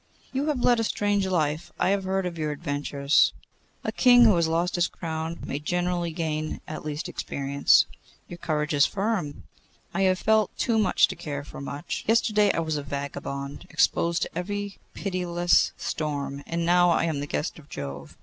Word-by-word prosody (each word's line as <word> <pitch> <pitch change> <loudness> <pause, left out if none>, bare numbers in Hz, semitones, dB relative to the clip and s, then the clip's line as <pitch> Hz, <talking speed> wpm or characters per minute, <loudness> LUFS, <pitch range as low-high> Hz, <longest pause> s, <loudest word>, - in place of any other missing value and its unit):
'You 275 +3 -1
have 290 -5 0
led 240 -1 +4
a - - +1
strange 205 -2 0
life! 155 -4 -1
I - - +2
have 195 -1 +1
heard 190 0 0
of 175 -1 -3
your 155 -2 -2
adventures.' 145 0 +1 0.5
'A - - -1
king 245 -1 +6
who 215 -4 +6
has 170 -1 +2
lost 170 +2 0
his 175 -1 +2
crown 160 0 -4
may 140 - -3
generally 175 +2 -1
gain 155 -2 -3
at 155 - -6
least 150 +2 -4
experience.' 140 0 +2 0.4
'Your 175 - -9
courage 150 -1 -1
is 145 0 +5
firm.' 195 -7 -2 0.5
'I 195 - 0
have 185 -1 +3
felt 220 +1 +2
too 230 -3 +1
much 190 -4 +4
to - - -5
care 145 -2 -5
for 145 - -10
much. 140 +1 -5
Yesterday 215 -2 +3
I - - -1
was 160 -2 -1
a - - -2
vagabond 140 +2 -5
exposed 170 0 +2
to - - -7
every 205 +3 -4 0.2
pitiless 175 -3 +1
storm, 140 -2 -3
and 170 0 -1
now 175 +1 +5
I 170 - +3
am 160 -3 -1
the 145 - -4
guest 150 - -3
of 145 - -17
Jove. 70 0 -7
170 Hz, 185 wpm, -26 LUFS, 145-190 Hz, 0.5 s, king